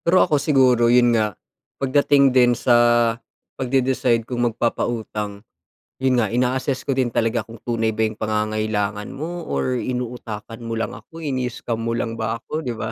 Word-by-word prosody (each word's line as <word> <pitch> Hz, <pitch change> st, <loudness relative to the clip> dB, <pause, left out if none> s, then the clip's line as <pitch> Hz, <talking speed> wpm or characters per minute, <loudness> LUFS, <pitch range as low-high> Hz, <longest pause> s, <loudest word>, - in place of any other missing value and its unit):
Pero 185 Hz, +2 st, +5 dB
ako 150 Hz, -2 st, +1 dB
siguro 130 Hz, -6 st, +4 dB
yun 120 Hz, 0 st, +5 dB
nga, 110 Hz, -3 st, 0 dB, 0.4 s
pagdating 140 Hz, 0 st, +3 dB
din 125 Hz, -1 st, +5 dB
sa 120 Hz, -, +2 dB, 0.8 s
pagde-decide 130 Hz, -3 st, +1 dB
kung 120 Hz, 0 st, -3 dB
magpapautang, 110 Hz, -2 st, -3 dB, 0.6 s
yun 130 Hz, -2 st, +3 dB
nga 110 Hz, -, +2 dB
ina-assess 125 Hz, +4 st, 0 dB
ko -, -, -1 dB
din 130 Hz, -2 st, +1 dB
talaga 115 Hz, 0 st, 0 dB
kung 115 Hz, -, -10 dB
tunay 115 Hz, -2 st, -1 dB
ba 110 Hz, -, +1 dB
yung 110 Hz, -1 st, -2 dB
pangangailangan 110 Hz, -1 st, -1 dB
mo 170 Hz, +4 st, -5 dB
or 125 Hz, -1 st, -1 dB
inuutakan 120 Hz, -3 st, -5 dB
mo 115 Hz, -1 st, -4 dB
lang 115 Hz, -, -2 dB
ako, 165 Hz, 0 st, -11 dB
ini-scam 125 Hz, -4 st, -3 dB
mo 115 Hz, 0 st, -2 dB
lang 115 Hz, -1 st, -3 dB
ba 110 Hz, 0 st, -1 dB
ako, 135 Hz, +6 st, -5 dB
di 125 Hz, -7 st, -4 dB
ba? 110 Hz, 0 st, -4 dB
120 Hz, 165 wpm, -22 LUFS, 110-130 Hz, 0.8 s, Pero